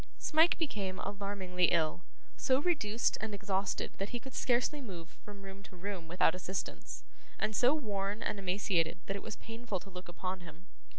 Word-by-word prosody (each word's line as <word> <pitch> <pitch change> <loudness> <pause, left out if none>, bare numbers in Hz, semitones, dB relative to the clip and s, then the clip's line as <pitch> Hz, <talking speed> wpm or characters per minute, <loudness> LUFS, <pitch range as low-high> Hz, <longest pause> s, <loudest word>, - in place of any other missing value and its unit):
Smike 320 +2 +5
became 200 - -1
alarmingly 195 -3 0
ill; 165 -1 +3 0.3
so 260 0 +3
reduced 240 -9 +2
and 215 -1 -2
exhausted 195 -1 0
that 195 +1 -1
he 240 - -2
could 265 +2 -9
scarcely 255 +4 +2
move 180 -9 -7
from 205 -1 -10
room 195 0 -8
to 195 - -13
room 180 -2 -4
without 170 -1 +4
assistance; 185 +1 -4 0.3
and 215 0 0
so 255 +7 +6
worn 205 -6 -1
and 200 - -1
emaciated, 180 -3 +2
that 195 - -2
it 200 - -4
was 220 - -5
painful 225 -3 -4
to 195 - -12
look 180 0 -8
upon 185 +2 -3
him. 170 0 -12
200 Hz, 175 wpm, -34 LUFS, 185-220 Hz, 0.3 s, so